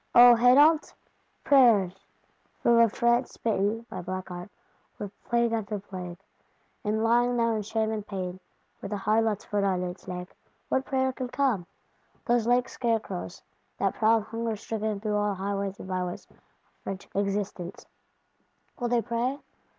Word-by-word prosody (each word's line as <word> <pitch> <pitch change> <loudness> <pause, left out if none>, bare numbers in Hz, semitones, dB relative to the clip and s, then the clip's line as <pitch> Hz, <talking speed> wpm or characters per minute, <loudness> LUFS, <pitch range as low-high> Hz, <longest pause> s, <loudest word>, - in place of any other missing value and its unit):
O 245 0 +10
Hénault! 285 +7 +5 0.5
Prayers? 215 - +4 0.6
From 235 -1 +5
a 230 -1 +6
France 235 +3 +1
smitten 225 +1 -1
(by - - -6
black 185 +1 -5
art) 175 +2 -7 0.5
with 205 -2 -6
plague 235 -1 +2
after 215 -2 -2
plague, 185 -3 -7 0.7
and 215 +1 0
lying 240 +2 +3
now 230 -1 +2
in 215 - -1
shame 220 +1 -1
and 215 -1 -4
pain, 185 -2 -4 0.4
with 195 - -6
a 205 - -1
Harlot's 215 +1 +1
foot 205 -1 -1
on 185 -2 +1
its 180 0 -7
neck, 180 0 -6 0.3
what 265 - +1
prayer 260 -1 0
can 255 -1 -4
come? 245 -9 0 0.6
Those 240 -2 +2
lank 245 +1 +3
scarecrows, 220 - -3 0.3
that - - +1
prowl 220 +1 +3
hunger 225 +1 -3
stricken 215 0 -3
through 210 0 -1
all 205 -1 0
highways 200 0 -3
and - - -9
byways 180 -1 -3
of - - -25 0.5
French 195 0 -6
Existence, 200 -2 -3 0.9
will 245 - 0
they 235 -1 +1
pray? 245 +3 -1
215 Hz, 150 wpm, -27 LUFS, 195-235 Hz, 0.9 s, O